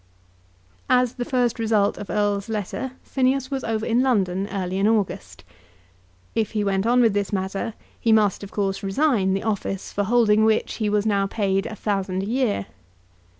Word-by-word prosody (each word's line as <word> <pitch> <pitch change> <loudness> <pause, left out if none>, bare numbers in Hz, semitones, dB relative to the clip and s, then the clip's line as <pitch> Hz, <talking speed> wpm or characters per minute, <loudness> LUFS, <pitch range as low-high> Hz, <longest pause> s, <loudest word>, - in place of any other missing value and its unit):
As 250 -1 +3
the 245 - -4
first 245 -2 0
result 215 -3 +1
of 205 - -7
Erle's 205 0 0
letter 220 +5 -3
Phineas 265 0 0
was 270 -1 -2
over 220 -1 -2
in 235 +2 +2
London 195 -7 +1
early 190 -1 -2
in 200 - +3
August. 185 - -1 0.9
If 220 -1 -1
he 210 -1 0
went 195 +1 0
on 245 +1 +4
with 225 -4 +4
this 200 -1 -1
matter, 195 +3 -3 0.2
he 230 - +1
must, 210 -3 +3
of 200 - -7
course, 195 -2 -2
resign 195 -2 +1
the 195 - -3
office 200 -3 -3
for 205 - 0
holding 220 -1 +4
which 220 0 +1
he 215 -2 0
was 210 0 +1
now 200 -2 +1
paid 195 -2 0
a 215 - -6
thousand 195 -2 -2
a - - -4
year. 230 - 0
210 Hz, 180 wpm, -23 LUFS, 195-230 Hz, 0.9 s, on